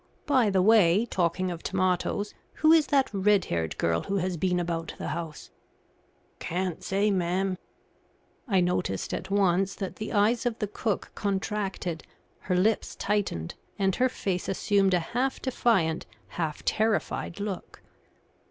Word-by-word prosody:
By 260 -7 +3
the 190 -2 +3
way, 210 -1 +5
talking 185 -3 0
of 170 -1 -6
tomatoes, 185 +2 0 0.2
who 310 0 +4
is 320 -2 +5
that 275 -5 +2
red 200 0 +3
haired 80 -2 -2
girl 85 0 +1
who 200 - -3
has 185 -1 -1
been 180 +1 +1
about 165 -1 -3
the - - -4
house?" 160 -2 -6 0.9
"Can't 180 0 -3
say, 200 +2 +1
ma'am." 185 +1 0 0.9
I 195 -5 +3
noticed 175 - -1
at - - -4
once 195 -1 +2
that 195 -2 -5
the 215 - -5
eyes 225 +3 +2
of 235 -2 -2
the 210 - -1
cook 210 0 -3
contracted, 195 -4 -2 0.4
her 180 - -1
lips 210 +5 +1
tightened, 200 - -1 0.2
and 195 -2 +1
her 255 +1 +3
face 185 -6 -3
assumed 195 -1 +2
a - - +3
half 245 +9 -1
defiant, 195 -11 +1 0.2
half 160 -3 -4
terrified 215 -4 0
look. 200 -3 -6
195 Hz, 145 wpm, -27 LUFS, 175-210 Hz, 0.9 s, way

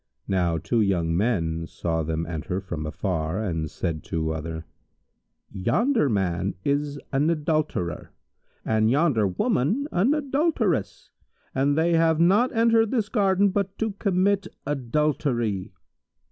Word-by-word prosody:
Now 90 -4 +1
two 115 +8 0
young 85 -5 +1
men 85 -6 0
saw 80 -1 -2
them 80 +1 -2
enter 85 +2 -3
from 85 -5 -5
afar 80 +1 -2
and 80 -7 -2
said 85 0 -3
each 75 - -15
to 80 -1 -1
other, 80 +1 -5 0.9
"Yonder 145 - +1
man 95 -2 -1
is 145 0 0
an 140 +3 +2
adulterer 155 - -1 0.5
and 110 0 +2
yonder 135 -6 +3
woman 210 - 0
an 215 +12 +2
adulteress, 270 - -1 0.4
and 140 +2 +1
they 170 +2 +2
have 165 -1 +3
not 200 +9 +4
entered 225 -1 +3
this 220 -4 0
garden 200 -3 +3
but 195 -1 -2
to 220 -1 -1
commit 200 0 +1 0.2
adultery." 130 -6 -1
130 Hz, 130 wpm, -25 LUFS, -, 0.9 s, not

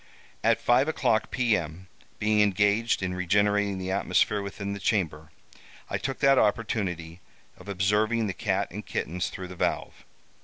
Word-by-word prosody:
"At - - +3
five 125 +4 +3
o'clock, 110 -8 +1
p.m., 95 -8 -1 0.3
being 105 0 +2
engaged 105 +2 +2
in 90 -1 -1
regenerating 100 +2 +1
the 95 0 -4
atmosphere 100 +1 +1
within 100 0 -5
the 100 - -6
chamber, 80 -8 -1 0.6
I - - -1
took 135 - -3
that 135 -2 +5
opportunity 95 -6 -1 0.3
of - - -13
observing 105 +4 +1
the 100 - -2
cat - - -1
and - - -6
kittens 90 +3 -3
through 90 -1 -7
the 90 - -8
valve. - - -2
100 Hz, 150 wpm, -27 LUFS, 95-110 Hz, 0.6 s, that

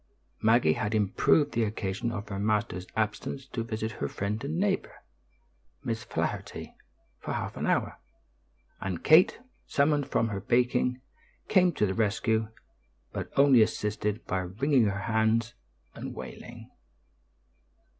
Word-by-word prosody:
Maggie 110 -7 +4
had 105 +5 -2
improved 110 +8 +3
the 115 - +1
occasion 105 +1 -2
of 105 -1 -6
her 100 -1 -4
master's 105 -3 -1
absence 110 +5 -2
to 125 -3 -4
visit 110 0 -3
her 70 - +1
friend 100 - -3
and 150 +4 -2
neighbor, 195 +1 -1 0.8
Miss - - -3
Flaherty, - - -4 0.5
for - - -4
half - - -3
an - - -2
hour; - - 0 0.8
and 90 -3 -4
Kate, 160 +4 +6 0.3
summoned 145 0 +2
from 115 - +1
her 100 -2 -3
baking, 125 +3 +1 0.5
came 185 -3 +5
to 105 - +1
the 95 - -1
rescue, 110 +1 +1 0.7
but - - -4
only 135 -4 +7
assisted 105 0 -1
by 95 - -1
wringing 115 +8 +2
her 100 0 -1
hands 110 +1 +1 0.4
and - - -7
wailing. - - -9
110 Hz, 135 wpm, -28 LUFS, 105-125 Hz, 0.8 s, only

